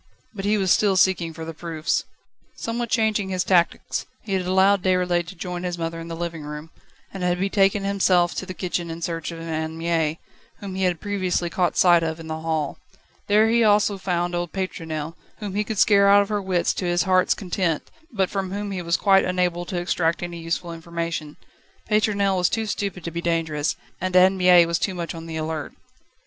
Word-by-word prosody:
But 195 -2 -5
he 210 +1 +2
was 190 -3 +1
still 200 -3 +3
seeking 175 -2 +3
for 160 0 -8
the 165 - -6
proofs. 160 -1 -2 0.5
Somewhat 235 0 -3
changing 220 -4 +1
his 185 -1 0
tactics, 175 -3 +1 0.2
he 205 - -4
had 185 -1 0
allowed 190 +1 +4
Déroulède 180 -2 +1
to 190 - -9
join 180 0 -5
his 175 -1 -3
mother 165 0 -3
in 165 - -7
the 165 - -5
living 170 -1 -4
room, 150 +2 -8 0.4
and 195 - -6
had 180 0 0
betaken 195 +1 +2
himself 185 -3 +2
to 190 - -5
the 185 - -6
kitchen 175 -2 -3
in 165 +1 -6
search 165 -1 -3
of 165 - -8
Anne 160 -1 -4
Mie, 165 -2 0 0.4
whom 200 -2 -7
he 190 0 0
had 175 -3 0
previously 185 -4 -1
caught 180 -1 0
sight 175 -2 +6
of 160 0 -3
in 165 - -9
the 160 0 -4
hall. 160 -3 -2 0.5
There 210 +2 +5
he 235 0 +3
also 205 -2 +3
found 175 -2 -1
old 175 -1 -2
Pétronelle, 165 -5 -4 0.2
whom 205 -3 -6
he 210 +1 0
could 215 0 -5
scare 200 -1 +5
out 200 0 +7
of 200 - -9
her 210 -1 -1
wits 185 -2 0
to 185 - -4
his 175 0 +2
heart's 185 -1 +3
content, 180 -4 -2 0.2
but 195 -5 0
from 195 -2 -2
whom 205 +1 -4
he 185 -2 -3
was 170 0 +1
quite 195 -1 +4
unable 180 -1 0
to 180 - -4
extract 175 -1 0
any 175 -1 -5
useful 165 +1 -3
information. 165 -2 -5 0.5
Pétronelle 200 -2 +2
was 180 -1 +2
too 225 -1 -1
stupid 200 -4 -3
to 170 - -4
be 170 +1 -4
dangerous, 160 -3 0 0.3
and 185 0 -2
Anne 185 +1 +6
Mie 180 -2 +6
was 170 0 -1
too 190 - -1
much 170 -1 -4
on 165 0 -8
the 160 -1 -5
alert. 155 0 -4
180 Hz, 210 wpm, -23 LUFS, 165-195 Hz, 0.5 s, out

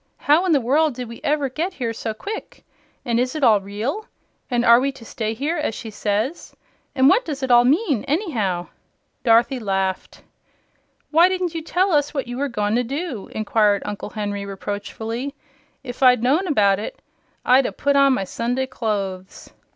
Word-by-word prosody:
How 310 +6 +3
in - - +2
the 295 - +4
world 280 +3 +2
did 250 -1 -5
we 230 0 -10
ever 290 -1 +1
get 325 +8 -3
here 235 -3 -3
so 225 0 -4
quick? 405 - -7 0.4
And 235 -1 +1
is 250 +3 -1
it 305 - -3
all 215 -5 +5
real? 220 - -4 0.4
And 240 -1 +1
are 235 0 +7
we 275 +2 0
to 250 -4 -13
stay 220 -2 -3
here, 295 +8 -2
as 295 -7 -2
she 220 - -7
says? 215 +9 -2 0.4
And 265 -1 +5
what 415 - +5
does 285 -4 -5
it 260 - 0
all 240 0 +6
mean, 290 - +2
anyhow?" 225 - -1 0.5
Dorothy 240 +3 +3
laughed. 195 -3 -2 0.9
"Why 335 +4 +6
didn't 365 -2 -2
you 330 - -3
tell 370 +4 +1
us 295 -1 +1
what 275 - -1
you 245 +1 -6
were 285 0 -1
goin' 210 -3 -1
to 245 - +1
do?" 275 - -5
inquired 210 -2 +1
Uncle 205 0 -5
Henry, 205 -1 -4
reproachfully. 220 +6 -5 0.5
"If 245 +2 -8
I'd 250 -3 +5
known 305 +10 +2
about 200 - +3
it, 215 - -6 0.5
I'd 255 +1 +5
'a - - -4
put 280 0 0
on 275 -1 +5
my 195 - -1
Sunday 245 +6 -2
clothes." 200 -7 -4
250 Hz, 185 wpm, -22 LUFS, 215-290 Hz, 0.9 s, are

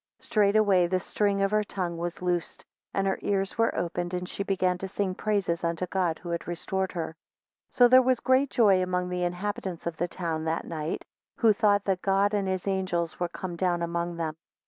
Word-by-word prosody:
7 - - -17
Straightway 205 -4 +4
the 185 +1 +1
string 200 +1 0
of 195 - +1
her 215 0 +3
tongue 185 -4 -3
was 170 +1 -5
loosed, 175 -2 -2 0.3
and 195 - 0
her 195 - 0
ears 195 +2 -1
were 230 - +2
opened, 175 +1 -2
and 180 0 -3
she - - -5
began 185 -2 0
to 195 - -4
sing 190 -1 -2
praises 195 -5 -1
unto 170 +1 -1
God, 180 -3 0
who 175 - -9
had 170 0 -3
restored 190 +2 -2
her. 165 -2 -4 0.6
8 - - -22
So 245 - +7
there 255 +1 +7
was 255 -1 +2
great 260 +1 +3
joy 200 -7 +4
among 180 0 -1
the 180 0 -2
inhabitants 180 0 -3
of 170 -1 -3
the 175 - 0
town 165 -3 -3
that 160 +1 -1
night, 155 -1 -4 0.3
who 225 -2 +5
thought 205 -1 +3
that 190 -2 0
God 195 +1 +2
and 200 -2 0
his 185 -1 -2
angels 185 -4 -1
were 175 -1 -1
come 180 0 -6
down 175 -1 0
among 170 0 -2
them. 160 -2 -2
185 Hz, 215 wpm, -27 LUFS, 175-200 Hz, 0.6 s, So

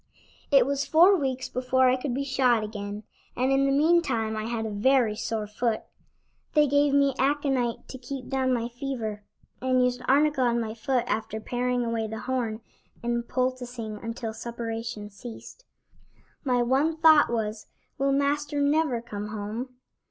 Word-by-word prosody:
It 275 -4 +6
was 280 +1 0
four 350 +7 +6
weeks 265 -6 -2
before 255 +1 +2
I 255 - +4
could 255 -1 -3
be 280 - -1
shod 255 -4 +2
again, 205 -1 -6 0.3
and 255 +2 +1
in 270 0 +3
the - - +2
meantime 275 -7 +2
I 215 0 -3
had 230 -1 -2
a 220 - -3
very 225 +1 +2
sore 220 -1 -3
foot. 220 +2 -1 0.7
They 300 -1 +6
gave 285 +1 +3
me 280 -1 +4
aconite 270 -4 0
to 260 - -8
keep 255 +1 -7
down 265 -1 0
my 235 -2 0
fever, 240 -4 -4 0.4
and 255 -1 +3
used 250 0 -1
arnica 290 0 +3
on 240 -1 +2
my 220 -2 -3
foot 245 +2 0
after 220 -2 -2
paring 245 +1 -1
away 230 -1 -1
the 220 0 -6
horn 235 -4 -2 0.4
and 235 0 -1
poulticing 250 -4 -2
until 230 0 -4
suppuration 230 -2 -5
ceased. 240 - -11 0.8
My 250 -3 +2
one 280 +6 +1
thought 315 -2 +6
was: 220 -2 -3 0.3
"Will 275 0 +2
Master 285 +1 0
never 285 -4 +2
come 210 -3 -6
home?" 215 +4 -5
250 Hz, 160 wpm, -26 LUFS, 225-275 Hz, 0.8 s, It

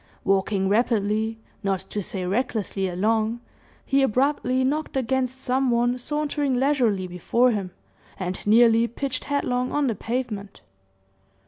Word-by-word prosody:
Walking 195 0 +1
rapidly, 220 0 +1 0.2
not 195 -2 -1
to 210 - -2
say 185 -1 -4
recklessly, 205 -2 -1
along, 220 +5 0 0.5
he 275 0 +2
abruptly 260 0 +1
knocked 295 +2 -1
against 260 0 -1
some 260 0 +1
one 240 +1 +1
sauntering 290 0 -1
leisurely 245 -8 +2
before 205 +8 +1
him, 200 -4 -2 0.5
and 185 -1 -4
nearly 230 +1 +5
pitched 270 +3 -4
headlong 255 -3 -1
on 295 -1 +1
the 240 - +1
pavement. 220 -2 -4
235 Hz, 125 wpm, -24 LUFS, 205-260 Hz, 0.5 s, nearly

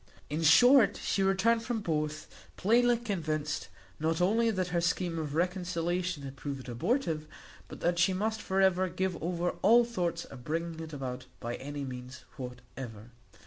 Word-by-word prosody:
In 155 +2 -1
short, 245 - +7
she 195 - -1
returned 195 +4 +3
from 230 -1 -2
both, 155 -3 -2 0.3
plainly 240 +4 +4
convinced, 155 -10 -2 0.3
not 160 +1 0
only 225 +6 +3
that 185 -4 -1
her 170 0 0
scheme 170 -1 0
of 150 -2 -4
reconciliation 180 -2 -1
had 135 0 -7
proved 135 -1 -6
abortive, 160 - -1 0.4
but - - -10
that 175 0 +1
she 175 +2 +4
must 215 +3 -1
for 190 -1 -1
ever 185 -1 +3
give 185 0 -2
over 175 +1 -1
all 235 +4 +6
thoughts 175 -7 -2
of 125 -3 -11
bringing 165 +3 -3
it 160 -1 -7
about 130 -3 -5
by 120 0 -4
any 145 +1 -5
means 130 0 -8
whatever. 125 -3 -8
170 Hz, 160 wpm, -30 LUFS, 145-190 Hz, 0.4 s, short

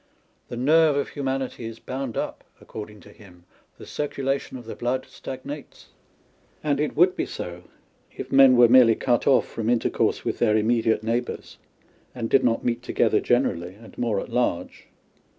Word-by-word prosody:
The 120 - -7
nerve 155 +4 +4
of 140 - -1
humanity 135 -3 -3
is 115 0 -8
bound 130 -1 -5
up, - - -4 0.2
according 105 -1 -10
to - - -16
him 90 -4 -17
â€" - - -35
the - - -11
circulation 140 -2 -3
of 120 - -11
the 115 - -7
blood 125 +2 -2
stagnates. 140 +2 -9 0.7
And 145 -2 0
it 150 - -1
would 180 +4 +4
be - - -2
so, 90 0 -7 0.5
if - - -8
men 135 -2 +7
were 120 -1 +8
merely 120 -2 +6
cut 120 -1 0
off 135 - +4
from 115 0 -3
intercourse 120 -1 0
with - - -2
their 110 -2 +3
immediate 110 0 +1
neighbours, 120 +2 -3 0.6
and 115 -2 -4
did 135 - +4
not 115 -2 +1
meet 120 0 0
together - - +1
generally 85 +2 0
and 110 +2 -15
more 115 -5 -1
at - - -7
large. 125 -8 -2
120 Hz, 170 wpm, -24 LUFS, 110-135 Hz, 0.7 s, were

